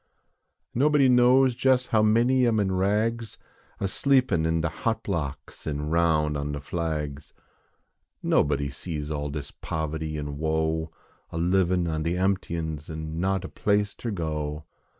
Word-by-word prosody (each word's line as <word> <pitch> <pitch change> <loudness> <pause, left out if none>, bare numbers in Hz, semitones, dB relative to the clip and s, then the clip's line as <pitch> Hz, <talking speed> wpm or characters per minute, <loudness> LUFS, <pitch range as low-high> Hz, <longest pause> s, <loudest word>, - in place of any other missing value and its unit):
Nobody 145 +1 +4
knows 125 +1 +5
jes 130 -1 +4
how 110 - +3
many 120 +4 +4
am 110 -2 +2
in 100 -2 +1
rags, 105 +4 0 0.4
A 95 - 0
sleepin 125 - +2
in 80 0 +1
de 85 - +1
hot 115 +6 -2
blocks 80 -8 -4
an 75 0 -2
roun 80 -3 +2
on 75 0 -3
de 70 - -3
flags. 75 -2 -4 0.9
Nobody 70 -1 +2
sees 75 +1 -5
all 75 -1 -2
dis 70 -1 -6
poverty 80 -1 -4
an 75 -1 -5
woe, 80 0 0 0.4
A - - -6
livin 90 0 +2
on 80 -1 -1
de 85 +2 -1
emptyins 85 -5 -1
an 80 0 -5
not 95 +1 0
a - - -4
place 100 0 0
ter 120 - -5
go. 75 -5 -3
85 Hz, 150 wpm, -26 LUFS, 75-105 Hz, 0.9 s, knows